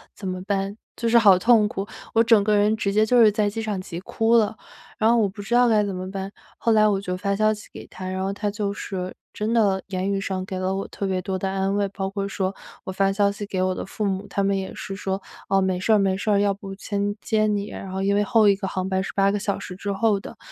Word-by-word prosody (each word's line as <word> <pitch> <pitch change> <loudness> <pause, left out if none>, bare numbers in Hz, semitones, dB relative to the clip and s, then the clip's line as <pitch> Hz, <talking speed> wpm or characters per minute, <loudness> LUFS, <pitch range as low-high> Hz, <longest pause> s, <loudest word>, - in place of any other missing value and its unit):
怎 195 - -7
么 185 0 -3
办？ 200 +1 -2 0.2
“就 230 -1 -1
是 235 - +5
好 200 -5 +6
痛 225 -1 +5
苦， 205 -3 -4 0.3
我 230 0 +5
整 225 -3 +5
个 210 0 +2
人 210 +2 +3
直 200 -2 -1
接 215 +1 +4
就 245 +2 +3
是 215 -2 +7
在 210 0 +1
机 225 +2 -4
场 205 -4 -2
急 175 -2 -7
哭 225 +4 +1
了。 220 -1 +3 0.4
然 220 +1 +4
后 235 - +4
我 215 -3 +3
不 205 +2 -8
知 235 +4 -1
道 245 0 +5
该 215 -2 +4
怎 195 -2 -3
么 185 +1 -5
办， 195 0 -5 0.3
后 230 - +1
来 215 -1 +5
我 200 -2 +1
就 180 -2 -3
发 200 +1 -1
消 215 +1 +3
息 210 -1 -6
给 - - -10
他， 185 0 -8
然 185 0 -3
后 195 +1 -1
他 205 0 -2
就 205 -1 -2
是 185 -2 -5 0.2
真 215 +2 -2
的 195 -5 +2
言 190 +1 -2
语 195 0 -1
上 185 -1 -3
给 190 -1 -5
了 190 +1 -1
我 195 - -3
特 200 - -4
别 185 -1 0
多 190 0 -2
的 190 - -1
安 195 0 0
慰， 200 -1 +1
包 195 0 -4
括 200 0 -3
说 195 -1 -2 0.3
我 190 - -5
发 195 +1 +1
消 200 0 +2
息 205 +1 -7
给 185 -2 -1
我 185 0 +1
的 - - -5
父 210 +2 -4
母， 195 +1 -2
他 200 - -1
们 200 0 +2
也 190 -1 -3
是 195 - -6
说：” 195 -1 -3 0.3
哦， 195 0 +4
没 190 -1 0
事 220 - 0
儿 - - +6
没 195 -1 +2
事 205 +2 -3
儿， 200 -1 +4
要 200 -1 +2
不 195 0 -9
先 205 0 -2
接 215 -1 +1
你。” 205 0 -1
然 190 - -7
后 190 +1 -2
因 200 +1 +2
为 205 - +3
后 225 -2 +4
一 200 - +5
个 195 -1 -4
航 190 -1 -3
班 190 0 0
是 - - -5
8 195 0 +3
个 205 - -1
小 200 0 -1
时 180 - -8
之 200 +1 -4
后 200 0 +2
的， - - -10
200 Hz, 305 characters per minute, -24 LUFS, 190-210 Hz, 0.4 s, 是